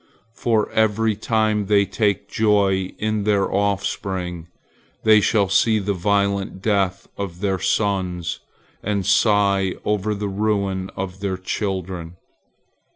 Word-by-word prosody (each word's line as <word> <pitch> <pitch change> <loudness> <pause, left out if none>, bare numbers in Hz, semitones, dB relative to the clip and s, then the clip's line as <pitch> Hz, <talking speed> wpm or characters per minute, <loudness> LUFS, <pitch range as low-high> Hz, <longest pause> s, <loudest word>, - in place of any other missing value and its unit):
For 115 -2 +1
every 110 0 +2
time 110 -1 0
they 100 -1 +4
take 100 +1 0
joy 100 -3 +2
in 110 -1 -1
their 100 -2 +1
offspring, 95 -3 -2 0.6
they 110 -1 +6
shall 100 0 +2
see 110 +3 +3
the 100 -1 -1
violent 100 +1 0
death 100 -2 0
of 90 -4 -5
their 95 -1 0
sons, 90 -6 -1 0.4
and 100 -2 -1
sigh 100 -2 +3
over 105 0 0
the 105 0 -3
ruin 100 -2 -1
of 95 0 -5
their 100 -2 -2
children. 95 -3 -4
100 Hz, 120 wpm, -22 LUFS, 95-105 Hz, 0.6 s, they